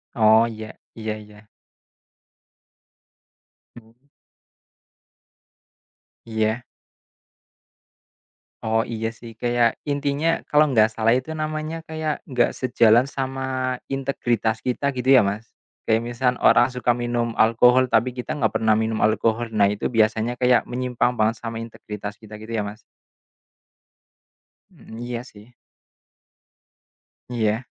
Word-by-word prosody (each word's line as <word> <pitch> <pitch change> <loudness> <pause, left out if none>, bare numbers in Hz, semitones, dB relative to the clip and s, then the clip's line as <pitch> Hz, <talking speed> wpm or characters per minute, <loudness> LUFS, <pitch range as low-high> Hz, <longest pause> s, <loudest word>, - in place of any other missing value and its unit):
Oh 110 0 +5
ya, 110 -1 -8 0.2
iya 110 -1 -4
iya. 105 0 -15 2.3
Hmm. 110 -1 -22 2.4
Iya. 110 +1 -1 2.0
Oh 110 0 +1
iya 115 -1 -3
sih 115 0 -12
kayak 120 -1 +1
intinya 145 +2 -1 0.2
kalau 150 0 +4
nggak 110 -2 +4
salah 115 +1 +2
itu 130 +5 -5
namanya 155 +1 -3
kayak 155 -1 -3
nggak 125 -2 +2
sejalan 120 0 +4
sama 130 -1 -3
integritas 120 -4 -1
kita 140 +2 -1
gitu 125 +1 -1
ya - - +7
Mas. 105 +3 -4 0.3
Kayak 110 0 +2
misal 125 +1 +2
orang 120 - +5
suka 125 -1 0
minum 120 -1 -2
alkohol, 125 +3 +4
tapi 125 +2 +2
kita 125 +5 -5
nggak 110 -4 +1
pernah 110 -1 +2
minum 110 0 -1
alkohol. 110 +2 +1
Nah 105 -2 +3
itu 105 +3 -2
biasanya 115 +1 +1
kayak 125 -1 +4
menyimpang 125 -1 0
banget 110 +1 +2
sama 115 0 -4
integritas 105 -2 -7
kita 105 -1 -12
gitu 110 +2 -10
ya 110 - 0
Mas. 105 +2 -8 1.9
Hmm 110 - -13
iya 120 0 -5
sih. 110 0 -16 1.8
Iya. 110 -1 0
115 Hz, 115 wpm, -23 LUFS, 110-125 Hz, 2.4 s, ya